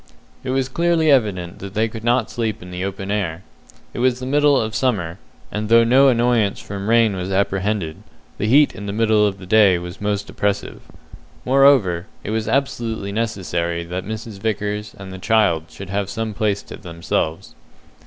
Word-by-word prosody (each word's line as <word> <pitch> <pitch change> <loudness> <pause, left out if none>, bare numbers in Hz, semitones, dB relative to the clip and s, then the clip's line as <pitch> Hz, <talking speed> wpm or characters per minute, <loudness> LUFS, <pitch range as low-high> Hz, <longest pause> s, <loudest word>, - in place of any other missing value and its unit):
It 130 - -5
was 130 0 0
clearly 165 +2 +2
evident 100 -10 +1
that 100 +1 -8
they 110 +2 +2
could 110 0 -8
not 120 +2 +1
sleep 110 -3 -3
in 90 - -10
the 90 +1 -4
open 95 0 -4
air. 90 -4 -2 0.5
It - - -6
was 125 0 +2
the 130 - -5
middle 145 0 +3
of 110 -1 -2
summer, 100 -8 -1 0.3
and 105 0 -3
though 115 0 +6
no 130 +4 +5
annoyance 120 -4 +2
from 100 +1 -5
rain 115 -3 +4
was 90 +1 -4
apprehended, 95 -3 -1 0.4
the 105 - 0
heat 145 +5 +5
in 100 +1 -8
the 100 - -3
middle 110 -1 +3
of 100 -1 -3
the 95 - -11
day 100 -2 +5
was 90 +2 -8
most 100 -1 -1
oppressive. 100 0 -2 0.6
Moreover, 125 -10 +4 0.2
it - - -4
was 110 0 -1
absolutely 115 -7 -1
necessary 90 -6 -2
that 90 +2 -5
Mrs. 110 0 -7
Vickers 105 0 -3
and 95 -1 -9
the 95 - -8
child 95 -6 +2
should 95 -1 -9
have 100 0 -1
some 110 0 -3
place 105 -1 -1
to - - -10
themselves. 85 -2 -3
105 Hz, 185 wpm, -20 LUFS, 95-115 Hz, 0.6 s, though